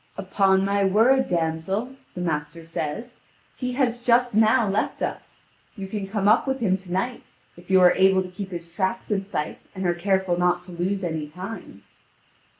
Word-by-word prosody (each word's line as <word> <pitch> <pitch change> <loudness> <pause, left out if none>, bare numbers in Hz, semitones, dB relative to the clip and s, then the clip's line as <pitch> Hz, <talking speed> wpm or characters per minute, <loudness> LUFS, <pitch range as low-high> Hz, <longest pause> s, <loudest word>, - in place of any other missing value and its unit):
"Upon 190 -1 +2
my 200 0 +1
word, 230 +7 +4
damsel," 175 +9 -2 0.2
the 180 - -4
master 165 0 -3
says, 165 +9 -5 0.4
"he 250 -1 -3
has 245 -2 0
just 245 0 +3
now 220 +1 +4
left 200 +2 -1
us. - - -5 0.3
You 195 -3 -6
can 195 0 -4
come 200 0 -1
up 220 +6 +4
with 265 0 -1
him 195 -6 +2
to 185 -2 -13
night, 195 +7 -2 0.3
if 175 +1 -17
you 190 -1 +5
are 180 -1 +7
able 190 0 +4
to - - -7
keep 190 +1 -7
his 170 -2 -8
tracks 190 +1 -2
in 195 -1 0
sight, 150 -6 -4 0.2
and 190 0 -4
are 175 - +2
careful 190 0 0
not 180 0 +2
to 180 0 -13
lose 185 +3 -2
any 160 -3 -3
time." 185 +8 -9
190 Hz, 185 wpm, -24 LUFS, 175-215 Hz, 0.4 s, are